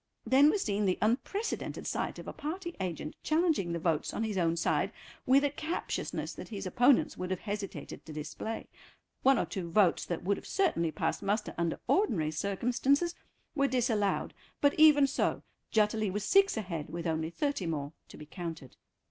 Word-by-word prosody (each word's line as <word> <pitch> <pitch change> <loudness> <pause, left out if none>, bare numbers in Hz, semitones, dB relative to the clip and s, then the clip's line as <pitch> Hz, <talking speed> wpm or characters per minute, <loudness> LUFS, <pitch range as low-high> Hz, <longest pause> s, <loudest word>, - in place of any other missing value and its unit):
Then 275 +3 +6
was 405 +4 +1
seen 205 0 0
the 185 - +1
unprecedented 270 - -1
sight - - -2
of - - -9
a - - -5
party 345 +3 -5
agent 175 -5 -4
challenging 310 - +1
the 170 - -1
votes 160 -2 -1
on 225 - -1
his 215 -2 -2
own 170 -2 +1
side - - +1 0.4
with 270 +2 +5
a 285 - +2
captiousness 315 +4 -3
that - - -8
his 200 -3 -6
opponents 245 +8 +3
would 185 0 -4
have 185 -1 -2
hesitated 205 -1 -5
to - - -7
display. 155 +9 -5 0.6
One 270 0 +5
or - - +1
two 185 -5 -5
votes 185 0 +3
that 175 - -4
would 200 +2 +1
have - - -10
certainly 320 - +1
passed - - -2
muster 210 +2 -1
under 170 -1 -1
ordinary 185 - +2
circumstances 245 - +1 0.4
were 275 -2 +2
disallowed, 225 -6 0 0.3
but 285 0 +4
even 300 -2 +8
so 275 - 0 0.3
Jutterly 215 -1 +2
was 205 +2 -3
six 395 - +4
ahead 170 -8 -4
with 170 +2 -5
only 160 -1 -1
thirty 280 - -2
more 150 -2 -3
to - - -12
be 150 - -9
counted. 165 -5 -7
210 Hz, 180 wpm, -31 LUFS, 170-280 Hz, 0.6 s, even